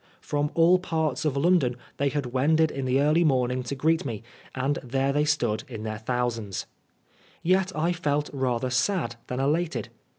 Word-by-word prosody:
From 145 0 -1
all 170 +2 +5
parts 160 -5 -1
of 140 -3 0
London 145 -5 +3 0.2
they 140 0 +1
had 145 -1 -2
wended 150 +6 +2
in 135 -1 -4
the 130 +1 +2
early 150 +4 +4
morning 130 -4 +1
to 125 +3 -4
greet 160 +4 +2
me, 115 -6 -5 0.3
and 135 +2 0
there 135 +2 0
they 150 +1 +2
stood 120 -8 0
in 115 -5 -7
their 110 -1 -4
thousands. 115 -4 -2 0.8
Yet 185 +2 +2
I 165 +3 +1
felt 150 -4 0
rather 130 -2 -1
sad 130 - 0
than 125 - -3
elated. 155 +5 0
140 Hz, 170 wpm, -26 LUFS, 125-160 Hz, 0.8 s, all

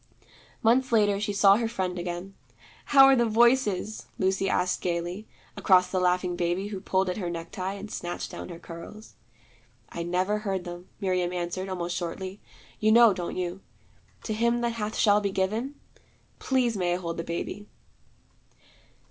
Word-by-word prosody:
Months 250 +3 +3
later 205 -3 +3
she 210 0 -1
saw 200 0 +5
her 230 0 0
friend 185 -5 -3
again. 175 +2 -5 0.5
'How 270 -1 +7
are 270 0 +6
the 240 -2 +2
Voices?' 220 -3 +2
Lucy 190 0 +1
asked 180 0 0
gayly, 175 +4 -3 0.3
across 180 -1 +4
the 185 - +1
laughing 180 0 +1
baby 175 +3 -1
who 195 -3 -6
pulled 190 -1 +1
at 180 - -2
her 180 -5 -3
necktie 170 +3 -4
and 200 +1 -8
snatched 175 0 -5
down - - -7
her 170 - -7
curls. 170 +6 -11 0.8
'I 170 - -6
never 185 +5 0
hear 195 -3 -1
them,' 175 0 -8
Miriam 185 -3 0
answered, 180 +2 -3
almost 175 -2 -3
shortly. 185 +3 -5 0.4
'You 215 0 +3
know, 230 -2 +7
don't 175 -2 -5
you, 180 +1 -3 0.6
"to 220 - -3
him 235 +2 +1
that 235 -1 0
hath 215 -1 -4
shall 210 -1 +4
be 200 - 0
given"? 215 +9 -1 0.6
Please 250 -3 +1
may 180 -3 0
I - - -1
hold 170 -2 -5
the 165 - -3
baby?' 185 +5 -5
190 Hz, 165 wpm, -27 LUFS, 180-215 Hz, 0.8 s, How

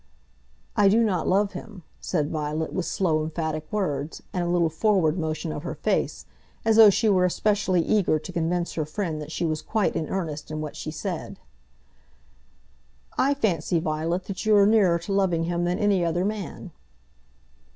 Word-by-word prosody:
"I 205 -1 +5
do 225 +4 +4
not 185 -7 0
love 200 +2 +2
him," 210 -6 -9 0.2
said 155 -4 -1
Violet, 155 0 -2
with 175 - -2
slow, 165 -6 +1
emphatic 155 -1 -4
words, 155 -7 -2
and 180 - -1
a - - -2
little 175 -1 +2
forward 170 -2 +2
motion 155 0 -3
of 150 - -5
her 175 - -5
face, - - -1 0.4
as 225 -1 +3
though 220 -2 +10
she 210 +3 +2
were 185 -3 +4
specially 195 -3 +1
eager 200 -6 +2
to 180 +4 -8
convince 170 +1 -1
her 160 - -1
friend 155 -1 -3
that 150 +1 -8
she 170 - -2
was 155 -1 -1
quite 215 +5 0
in 155 - -2
earnest 155 -6 -4
in 155 0 -4
what 155 -1 -5
she - - -5
said. 155 - -5 1.8
"I 280 +2 +2
fancy, 175 - 0
Violet, 160 +3 -1
that 190 0 -6
you 215 -1 +4
are 200 - +6
nearer 200 -5 +4
to 170 +4 -5
loving 185 -4 +1
him 175 +1 -1
than 175 +1 0
any 200 -4 +2
other 175 +2 0
man." 210 -3 -5
175 Hz, 180 wpm, -25 LUFS, 155-200 Hz, 1.8 s, though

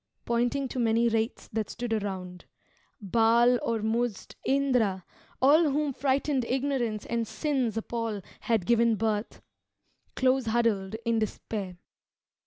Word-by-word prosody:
pointing 245 +4 0
to 255 - -5
many 230 0 +3
wraiths 225 0 -1
That 215 -2 -3
stood 240 -1 -3
around 190 -4 -4 0.5
Baal, 235 +4 +4
Ormuzd, 225 0 -1
Indra, 250 -9 +1 0.3
all 300 +5 +5
Whom 290 0 0
frightened 270 0 0
ignorance 250 -4 -1
and 230 -1 -2
sin's 260 -7 -1
appall 225 -3 -3 0.2
Had 225 -6 0
given 235 0 +3
birth, 215 +1 -2 0.7
close 260 -1 +2
huddled 220 -4 +1
in 230 -1 +2
despair. 205 -3 -4
230 Hz, 115 wpm, -28 LUFS, 220-255 Hz, 0.7 s, all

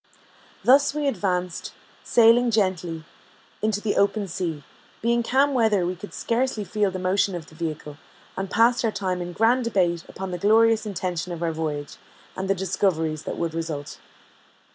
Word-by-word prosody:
Thus 280 +3 +5
we 295 -1 0
advanced, 180 -6 -2 0.3
sailing 235 +1 +5
gently, 180 -7 -1 0.6
into 215 -1 0
the 210 -1 -1
open 200 0 +2
sea; 170 -4 -4 0.4
being 235 +1 +1
calm 270 +4 +2
weather, 220 -7 +2
we 180 +1 -2
could 205 +3 -10
scarcely 235 -2 -1
feel 205 0 0
the 185 - -5
motion 185 +1 +1
of 170 -3 -6
the 160 - -18
vehicle, 155 -2 -5 0.4
and 190 0 -4
passed 235 +4 +3
our 225 - +2
time 185 -3 -2
in 175 0 -5
grand 230 +7 +2
debate 180 -7 +1
upon 190 -1 -6
the 180 - -4
glorious 220 +2 +4
intention 180 -3 -3
of 170 0 -5
our 165 - 0
voyage, 155 -2 -4 0.4
and 190 0 -4
the 195 - +3
discoveries 170 -4 -1
that - - -4
would 165 -1 -2
result. 160 -3 -5
190 Hz, 165 wpm, -24 LUFS, 170-225 Hz, 0.6 s, Thus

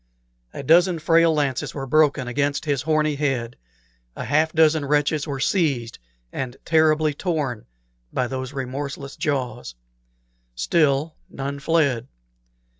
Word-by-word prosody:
A - - -7
dozen 175 +4 +4
frail 165 +1 +4
lances 145 -4 -1
were 135 -2 -4
broken 145 -2 +2
against 140 +4 -1
his 145 -3 0
horny 155 0 +1
head, 130 -5 -1 0.6
a - - -5
half 155 +3 +2
dozen 160 -1 +3
wretches 150 +1 +1
were 140 -2 -4
seized 135 - 0 0.3
and 130 -1 -4
terribly 155 -1 +3
torn 145 - -3 0.4
by 130 - 0
those 130 +1 -4
remorseless 140 +1 -5
jaws. 130 - -3 0.8
Still 145 - +1 0.2
none 140 +1 -5
fled. 140 -6 +1
145 Hz, 120 wpm, -23 LUFS, 135-155 Hz, 0.8 s, dozen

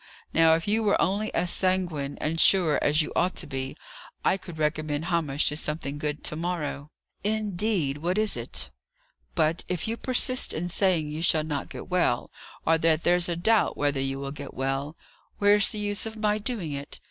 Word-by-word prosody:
Now, 160 0 +6
if 165 +3 -3
you 215 +2 +2
were 210 -2 +2
only 205 +3 +1
as 175 - +2
sanguine 175 -7 0
and 160 +2 -1
sure 170 -4 +5
as 150 +2 +4
you - - -6
ought 180 +2 +1
to - - -2
be, 135 -2 -5 0.5
I - - +4
could 175 -4 -9
recommend 155 0 -1
Hamish 160 -5 +1
to 150 - -4
something 150 -2 -3
good 150 0 -3
to - - -1
morrow." 155 -4 -3 0.3
"Indeed! 205 -8 0
What 175 +5 -1
is 215 -1 +2
it?" - - -4 0.6
"But, 160 0 +1
if 180 0 -2
you 225 +1 -2
persist 255 0 +1
in 175 +3 -3
saying 175 -4 +1
you 155 +2 -4
shall 160 -2 +3
not 150 -2 -3
get - - -8
well, 180 -10 +1 0.3
or 165 0 +3
that 160 0 +2
there's 175 0 +3
a 170 - 0
doubt 215 +6 +2
whether 145 -2 +1
you 135 0 -2
will 140 0 -5
get 140 -1 -8
well, 135 +3 -2 0.4
where's 205 0 +4
the - - -5
use 205 +1 -2
of 220 0 -8
my 210 0 +1
doing 210 - -3
it? 140 0 -6
165 Hz, 195 wpm, -26 LUFS, 150-195 Hz, 0.6 s, Now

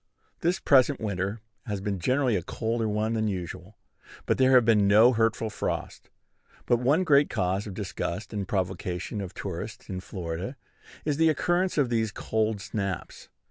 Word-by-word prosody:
This 175 +3 +1
present 140 0 +4
winter 100 0 -3 0.3
has 105 -2 -2
been 100 -1 -3
generally 130 +4 +2
a 90 - 0
colder 115 +5 -2
one 105 +2 0
than 110 -1 0
usual; 95 +1 -5 0.5
but - - +1
there 130 0 +5
have 125 -3 +6
been 105 -3 +4
no 110 +5 +6
hurtful 115 -1 +1
frosts. - - -4 0.6
But 120 - +3
one 140 +9 +3
great 145 -4 +4
cause 95 +3 -1
of 100 - -7
disgust 100 0 -4
and 100 -3 -3
provocation 95 +1 -2
of 95 -1 -7
tourists 95 +3 -6
in 95 - -3
Florida 90 - -5 0.5
is 150 -2 0
the 160 0 +4
occurrence 175 +4 +1
of 140 -5 +3
these 110 -2 0
"cold 110 -1 -1
snaps." 100 -4 -4
110 Hz, 165 wpm, -27 LUFS, 95-125 Hz, 0.6 s, have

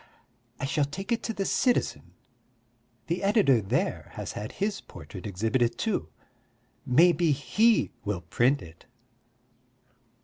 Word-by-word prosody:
I - - -2
shall 145 +1 +1
take 195 - -7
it 235 - +1
to - - -3
the 200 -3 -3
Citizen; 250 +3 0 0.9
the 170 +2 -2
editor 195 - +4
there 95 - -1
has - - -5
had 105 - -6
his 200 0 -2
portrait 95 0 -10
exhibited 115 +5 0
too. 195 - -1 0.8
Maybe 165 +4 +4
he 215 - +2
will 100 -3 -2
print 120 - +1
it. 80 0 -15
145 Hz, 125 wpm, -27 LUFS, -, 0.9 s, editor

